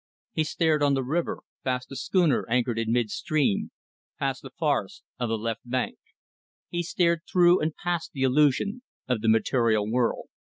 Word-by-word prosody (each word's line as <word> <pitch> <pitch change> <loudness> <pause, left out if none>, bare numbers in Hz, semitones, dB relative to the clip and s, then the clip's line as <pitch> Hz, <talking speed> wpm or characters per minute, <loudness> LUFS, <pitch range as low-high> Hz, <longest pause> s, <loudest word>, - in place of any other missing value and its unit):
He 155 - +1
stared 155 -1 +1
on 140 -1 +3
the 135 - 0
river, 160 +7 -2 0.2
past 125 -1 -2
the 135 - -8
schooner 175 -1 +2
anchored 120 -1 +1
in 115 0 -1
mid 120 -3 +1
stream, 145 -10 0 0.5
past 135 -2 -2
the 135 - -9
forests 160 +8 -1 0.2
of 120 -2 -1
the 115 - 0
left 115 +1 -3
bank; 125 0 -2 0.7
he 175 - -1
stared 170 -1 +1
through 175 0 +5
and 155 0 -1
past 175 -1 -2
the 135 - -3
illusion 150 - +2 0.3
of 125 -4 0
the 110 - +2
material 110 -1 +2
world. 120 +1 0
135 Hz, 170 wpm, -26 LUFS, 120-165 Hz, 0.7 s, through